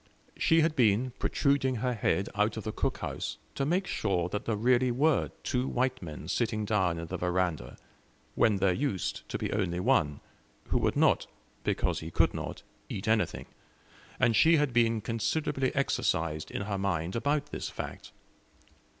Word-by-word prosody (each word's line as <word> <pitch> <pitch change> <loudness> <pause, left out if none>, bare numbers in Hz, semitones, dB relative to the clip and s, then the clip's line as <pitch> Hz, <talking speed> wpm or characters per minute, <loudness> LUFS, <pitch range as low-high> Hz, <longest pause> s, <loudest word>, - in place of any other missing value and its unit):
She 165 0 +4
had 160 0 +1
been 120 0 +3
protruding 140 -2 +1
her 125 +2 -1
head 100 -3 0
out 105 +2 +1
of 110 - -4
the 110 - -3
cookhouse - - -3 0.2
to 135 - -1
make 180 +5 +1
sure 90 - -1
that 105 - -4
there 115 - 0
were 105 - -7 0.2
really 130 +4 +2
two 125 +1 0
white 130 0 0
men 80 -3 -7
sitting 110 +1 0
down 95 -5 +1
in 85 - -4
the - - -4
veranda, 90 -2 -1 0.6
when 110 - +3
there 95 -1 +2
used 105 - -2
to - - -2
be - - -3
only 95 -4 0
one, 90 - +2 0.5
who - - +2
would - - +1
not, - - +3 0.4
because - - 0
he 80 - -6
could - - +2
not, - - -6 0.3
eat 95 - -5
anything; 110 -1 +1 0.7
and 115 - +3
she 165 +6 +6
had 145 -4 +1
been 115 -2 +3
considerably 130 +5 -1
exercised 80 - 0
in - - -3
her 100 -1 -3
mind 90 -3 -1
about 145 +4 0
this - - -4
fact. - - -7
110 Hz, 165 wpm, -29 LUFS, 95-130 Hz, 0.7 s, she